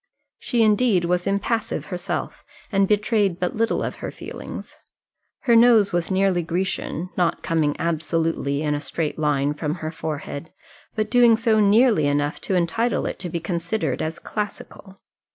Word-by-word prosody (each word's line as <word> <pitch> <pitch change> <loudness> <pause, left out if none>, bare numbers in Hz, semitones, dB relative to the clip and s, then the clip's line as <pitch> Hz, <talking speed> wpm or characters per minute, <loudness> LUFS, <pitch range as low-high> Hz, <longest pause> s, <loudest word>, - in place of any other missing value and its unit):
She, 235 -2 +1
indeed, 210 -4 +3
was 180 +1 0
impassive 220 +3 -1
herself, 180 0 -4 0.3
and 195 -1 +3
betrayed 210 -3 +1
but 180 - -1
little 225 +1 0
of - - -4
her - - -5
feelings. - - -9 0.6
Her 240 -3 +3
nose 230 -4 +5
was 175 -1 0
nearly 190 -2 +2
Grecian, 180 0 -3
not 175 -2 0
coming 155 -3 +1
absolutely 160 -3 -1
in 150 -1 0
a 145 - -1
straight 160 0 -3
line 145 -1 +1
from 150 +1 -3
her 155 -3 -5
forehead, 155 -1 -5 0.4
but 215 -1 -1
doing 240 -2 +6
so 225 -1 +2
nearly 210 - +4
enough 145 +2 0
to 190 - -1
entitle 190 +7 0
it - - -4
to 180 - -5
be 170 - -3
considered 170 +4 -2
as 160 +1 -3
classical. 205 -2 -6
180 Hz, 155 wpm, -23 LUFS, 160-215 Hz, 0.6 s, doing